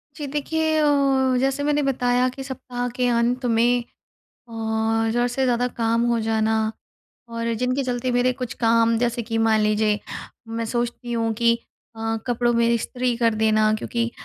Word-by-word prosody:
जी। 300 -2 -5
देखिए, 315 +2 -1
अ, 305 - +3 0.5
जैसे 270 +2 0
मैंने 295 0 +1
बताया 250 -2 +1
कि 270 +2 -8
सप्ताह 250 -2 -5
के 250 0 +1
अंत 240 +2 +1
में 240 +1 +2 0.6
और 225 0 -1
ज़रूरत 240 +1 0
से 265 +2 -1
ज़्यादा 245 -1 +1
काम 230 0 +2
हो 235 - +1
जाना। 220 0 +1 0.7
और 230 0 -3
जिनके 255 +2 0
चलते 250 0 -2
मेरे 245 +1 +2
कुछ 250 -2 -4
काम 230 0 +2
जैसे 240 0 0
कि 225 0 -3
मान 220 -1 +3
लीजिए 210 0 +1 0.5
मैं 230 0 -3
सोचती 240 +1 -3
हूँ 225 -1 0
कि 235 +1 +2 0.4
अ, 225 0 -2
कपड़ों 240 0 +1
में 235 0 +3
इस्त्री 245 +1 -1
कर 230 -2 +2
देना 215 0 +2
क्योंकि 235 +2 -2
235 Hz, 165 wpm, -23 LUFS, 225-250 Hz, 0.7 s, अ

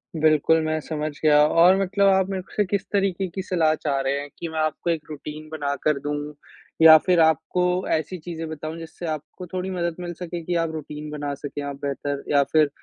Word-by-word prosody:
बिल्कुल, 155 0 +3
मैं 155 0 0
समझ 155 0 -3
गया 150 -1 +6
और 170 +4 +6
मतलब 195 +1 +2
आप 190 -1 +3
मेरे 190 -1 -3
से 210 - +2
किस 200 +1 -2
तरीके 195 -2 0
की 185 +2 -5
सलाह 170 -4 +2
चाह 140 -3 -1
रहे 135 +1 0
हैं, 145 0 -7
कि 170 - -4
मैं 160 0 -4
आपको 155 +2 -1
एक 165 -2 0
रूटीन 155 +1 -8
बना 145 -3 -2
कर 150 -2 +2
दूँ 145 +1 -4 0.5
या 160 -1 +10
फिर 180 -2 +3
आपको 160 +2 +2 0.3
ऐसी 160 +4 -1
चीज़ें 165 -1 -6
बताऊँ 155 +1 -6
जिससे 165 +1 -8
आपको 155 +4 -11
थोड़ी 185 +1 -2
मदद 170 -2 -2
मिल 175 -1 -5
सके 175 -1 -5
कि 175 +2 -2
आप 165 -1 0
रूटीन 150 -1 -7
बना 145 -1 -3
सकें? 145 +1 -6
आप 140 0 -4
बेहतर 140 0 -3
या 140 -1 +5
फिर 155 -2 +4
160 Hz, 210 wpm, -24 LUFS, 150-175 Hz, 0.5 s, या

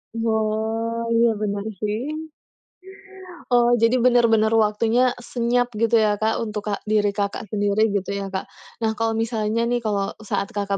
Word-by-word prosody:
Oh. 225 +1 -1
Iya 230 0 +4
bener 205 -1 -2
juga, 210 - -11
sih. 210 0 -2 1.5
Oh, 240 0 +4
jadi 230 +2 +3
bener-bener 235 -3 +4
waktunya 225 +3 +2
senyap 245 0 -1
gitu 230 +1 +3
ya, 210 -1 +2
Kak, 220 +1 +1
untuk 210 -1 -4
kak 200 - -2
diri 210 -1 +2
Kakak 200 +1 -3
sendiri 205 +1 +2
gitu 200 -1 -2
ya, 195 -1 -4
Kak. 190 - -3 0.3
Nah, 225 -1 0
kalau 225 0 -1
misalnya 225 0 -1
nih, 240 0 0
kalau 200 -2 -1
saat 200 -2 -2
Kakak 200 -1 -1
220 Hz, 155 wpm, -22 LUFS, 205-230 Hz, 1.5 s, Iya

